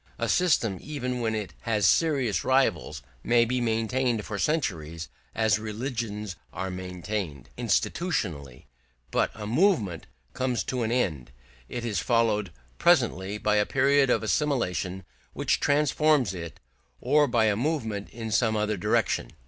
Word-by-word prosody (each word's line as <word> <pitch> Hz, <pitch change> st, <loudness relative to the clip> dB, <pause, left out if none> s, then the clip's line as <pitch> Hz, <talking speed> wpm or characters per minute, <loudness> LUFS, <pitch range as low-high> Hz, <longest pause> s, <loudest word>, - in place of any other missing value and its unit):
A -, -, -1 dB
system, 120 Hz, -, +2 dB
even 125 Hz, -4 st, -4 dB
when 110 Hz, -1 st, 0 dB
it 105 Hz, -2 st, -4 dB
has 105 Hz, -3 st, +1 dB
serious 135 Hz, -6 st, +2 dB
rivals, 130 Hz, -8 st, +1 dB, 0.2 s
may 120 Hz, 0 st, +4 dB
be 125 Hz, +1 st, -1 dB
maintained 115 Hz, 0 st, 0 dB
for 100 Hz, -, -4 dB
centuries 85 Hz, -, -2 dB, 0.3 s
as 110 Hz, -1 st, +2 dB
religions 110 Hz, -3 st, -4 dB, 0.2 s
are 95 Hz, +1 st, -4 dB
maintained, 90 Hz, -, -5 dB
institutionally; 95 Hz, -, -1 dB, 0.5 s
but -, -, +2 dB
a 105 Hz, -, -6 dB
movement 115 Hz, -, +1 dB, 0.3 s
comes 130 Hz, -2 st, -1 dB
to 125 Hz, -1 st, -2 dB
an 115 Hz, 0 st, -1 dB
end; 85 Hz, -, -1 dB, 0.4 s
it 120 Hz, -1 st, -4 dB
is 110 Hz, -4 st, -1 dB
followed 110 Hz, -5 st, +1 dB, 0.3 s
presently 95 Hz, +3 st, +2 dB
by 105 Hz, 0 st, +1 dB
a 105 Hz, -, +3 dB
period 135 Hz, 0 st, +3 dB
of 125 Hz, -, +2 dB
assimilation 105 Hz, -, -1 dB, 0.3 s
which -, -, 0 dB
transforms 145 Hz, -, +2 dB
it, 85 Hz, -4 st, -7 dB, 0.4 s
or 145 Hz, +3 st, +3 dB
by 120 Hz, -2 st, +2 dB
a 105 Hz, -2 st, +2 dB
movement 110 Hz, -6 st, -2 dB
in 115 Hz, -1 st, -6 dB
some 110 Hz, +1 st, +2 dB
other 105 Hz, 0 st, 0 dB
direction. 90 Hz, -, 0 dB
110 Hz, 140 wpm, -27 LUFS, 100-130 Hz, 0.5 s, may